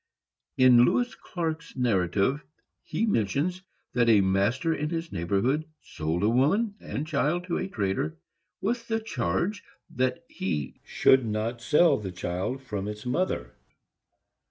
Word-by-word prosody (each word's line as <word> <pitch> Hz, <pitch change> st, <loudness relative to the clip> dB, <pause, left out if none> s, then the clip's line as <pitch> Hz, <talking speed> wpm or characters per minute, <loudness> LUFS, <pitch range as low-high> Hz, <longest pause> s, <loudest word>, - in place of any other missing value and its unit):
In 125 Hz, -2 st, +7 dB
Lewis 245 Hz, -, +2 dB
Clark's 165 Hz, -2 st, -5 dB
narrative 110 Hz, +3 st, +1 dB, 0.4 s
he 225 Hz, -, -1 dB
mentions 170 Hz, -, 0 dB, 0.3 s
that 120 Hz, -1 st, +3 dB
a 105 Hz, -3 st, +6 dB
master 100 Hz, -, +1 dB
in 150 Hz, -1 st, -2 dB
his 165 Hz, 0 st, -4 dB
neighborhood 100 Hz, -, 0 dB
sold 80 Hz, +3 st, -3 dB
a -, -, +4 dB
woman 160 Hz, -, +2 dB
and 145 Hz, -, -4 dB
child 155 Hz, +3 st, 0 dB
to 180 Hz, -1 st, -2 dB
a -, -, -2 dB
trader, 95 Hz, -, -2 dB, 0.4 s
with 230 Hz, +3 st, -1 dB
the 225 Hz, 0 st, 0 dB
charge 175 Hz, -, -2 dB, 0.3 s
that 125 Hz, 0 st, -1 dB
he 75 Hz, -7 st, -4 dB
should 130 Hz, -1 st, +4 dB
not 110 Hz, +3 st, -2 dB
sell 150 Hz, +8 st, +4 dB
the 95 Hz, -3 st, -5 dB
child 90 Hz, +9 st, -3 dB
from 105 Hz, -6 st, -4 dB
its 105 Hz, +2 st, -6 dB
mother. 125 Hz, -, -1 dB
125 Hz, 135 wpm, -27 LUFS, 100-165 Hz, 0.4 s, In